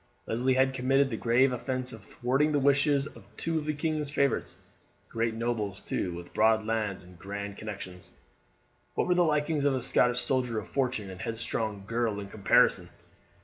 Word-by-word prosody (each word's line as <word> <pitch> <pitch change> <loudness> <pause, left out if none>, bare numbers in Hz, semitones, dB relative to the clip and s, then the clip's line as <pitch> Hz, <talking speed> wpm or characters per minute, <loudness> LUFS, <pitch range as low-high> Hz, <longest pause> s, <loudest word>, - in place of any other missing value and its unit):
Leslie 125 +3 +1
had 130 0 +3
committed 135 +1 +2
the - - -1
grave 120 +4 +3
offence 130 +1 -3
of 110 -2 -11
thwarting 135 +8 0
the 145 - +2
wishes 140 0 +3
of 115 -9 -12
two 165 -1 -1
of 150 - -6
the 155 - +1
king's 155 -1 -1
favourites, 140 -1 0 0.5
great 115 0 -1
nobles, 110 -4 -2
too, 90 - -2
with 85 0 -10
broad 110 0 +3
lands 110 -4 -1
and 90 -1 -16
grand 100 +1 -5
connections. 95 -4 -8 0.9
What - - +1
were 180 - +3
the 180 - +3
likings 150 -2 +1
of 140 -2 +3
a 130 - -2
Scottish 125 0 +3
soldier 125 -4 0
of 105 - -4
fortune 125 -7 -1
and 95 - -10
a - - -6
headstrong 110 -2 -2
girl 115 -2 -1
in 100 -1 -7
comparison! 100 -1 +3
120 Hz, 185 wpm, -29 LUFS, 105-140 Hz, 0.9 s, had